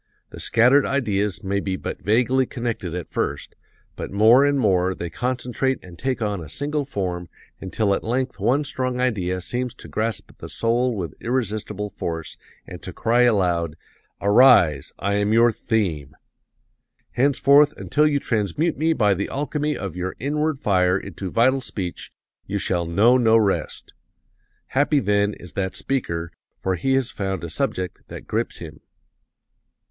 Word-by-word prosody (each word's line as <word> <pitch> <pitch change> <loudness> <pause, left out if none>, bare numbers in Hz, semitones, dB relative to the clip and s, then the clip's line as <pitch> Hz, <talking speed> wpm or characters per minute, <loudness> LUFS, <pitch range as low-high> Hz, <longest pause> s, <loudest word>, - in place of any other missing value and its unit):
The - - -9
scattered 125 +5 +4
ideas 105 -8 -1
may 100 +1 0
be 95 -1 -2
but - - -6
vaguely 125 +4 +2
connected 115 -8 -4
at 90 - -5
first, - - -3 0.4
but - - -6
more 110 +7 +6
and 145 -1 +2
more 95 -5 +2
they 85 -1 -6
concentrate 125 +4 -1
and 90 -2 -12
take 130 -3 -1
on 100 -3 -2
a 80 - -9
single 145 - -2
form 90 - -4 0.3
until 100 +2 0
at - - -2
length 125 +3 -2
one 140 +4 +2
strong 130 -3 -2
idea 95 -8 0
seems 125 +6 -3
to - - -11
grasp 110 +1 -3
the - - -8
soul 120 +1 0
with 85 -7 -4
irresistible 105 -4 -2
force, 80 -4 -5 0.3
and - - -10
to - - -6
cry 120 +2 +1
aloud, 85 -6 0 0.4
'Arise, 100 - +5
I 100 +1 -1
am 105 +1 +1
your 115 +1 +5
theme! 85 -11 -2 1.0
Henceforth, 140 +3 +4
until 150 +1 +2
you 145 -2 +1
transmute 120 - -1
me 160 +1 +2
by 105 -8 +3
the 95 +1 -3
alchemy 150 +1 -2
of 95 -4 -5
your 90 +1 -4
inward 150 +3 -1
fire 90 -5 +2
into 95 -1 -6
vital 130 +6 +3
speech, 95 -8 -5 0.4
you - - -2
shall 85 -2 -1
know 110 +9 +4
no 115 -2 +4
rest!' 105 -3 -1 0.8
Happy, 145 +2 +2
then, 100 -2 +1
is 90 -4 -12
that 95 +1 -2
speaker, 85 -11 -2 0.3
for 95 - -1
he 135 +10 0
has 135 -2 0
found 95 -4 -3
a 85 - -5
subject 90 +3 -2
that - - -9
grips - - -2
him. - - -10
110 Hz, 160 wpm, -23 LUFS, 95-130 Hz, 1.0 s, more